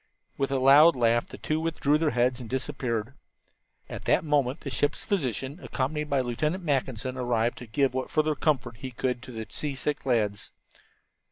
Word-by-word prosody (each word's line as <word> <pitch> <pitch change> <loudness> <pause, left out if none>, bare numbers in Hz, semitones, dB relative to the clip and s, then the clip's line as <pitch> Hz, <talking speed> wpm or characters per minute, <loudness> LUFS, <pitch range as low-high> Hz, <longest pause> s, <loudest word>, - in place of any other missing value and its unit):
With 135 - -1
a 135 - 0
loud 140 +5 +7
laugh 120 -1 +2
the - - -10
two 155 +1 -1
withdrew 155 -2 +1
their 160 -1 +2
heads 125 0 +1
and 115 - -8
disappeared. 130 -3 -2 0.7
At - - -8
that - - +3
moment 145 -2 +1
the 140 - -5
ship's 145 +4 -1
physician, 135 - -2
accompanied 150 +3 -2
by 140 -2 +2
Lieutenant 150 +9 -2
Mackinson, 130 -4 -1
arrived 120 -2 0
to 125 - -9
give 135 +4 +1
what 130 0 -3
further 155 0 +2
comfort 130 -6 0
he 130 +3 -6
could 125 0 -2
to 125 - -10
the 110 -2 -5
seasick 145 0 -3
lads. 110 -6 0
130 Hz, 175 wpm, -27 LUFS, 120-150 Hz, 0.7 s, loud